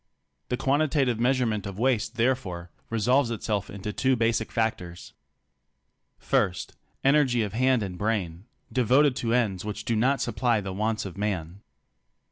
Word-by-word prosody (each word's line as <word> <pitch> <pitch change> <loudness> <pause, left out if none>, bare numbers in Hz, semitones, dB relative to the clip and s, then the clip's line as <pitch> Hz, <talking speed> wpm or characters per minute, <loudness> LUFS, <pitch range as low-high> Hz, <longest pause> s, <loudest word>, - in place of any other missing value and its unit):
The 125 - -1
quantitative 135 -3 +1
measurement 120 -5 +1
of 100 -1 -7
waste 115 -2 0
therefore 110 -8 -1 0.2
resolves 120 +4 +2
itself 105 -3 -2
into 100 +1 -6
two 130 +3 +2
basic 115 -1 0
factors: 90 -6 -3 1.1
1. 90 - +3 0.5
Energy 135 -4 +3
of 100 -2 -4
hand 130 0 +2
and 90 -3 -6
brain 100 -4 -2 0.3
devoted 130 +3 +3
to 115 0 0
ends 100 -7 0
which 105 0 -5
do 115 - 0
not 130 +5 +2
supply 115 0 +1
the 95 -2 -5
wants 110 +2 -1
of 95 0 -8
man. 95 -3 -3
115 Hz, 140 wpm, -26 LUFS, 100-125 Hz, 1.1 s, 1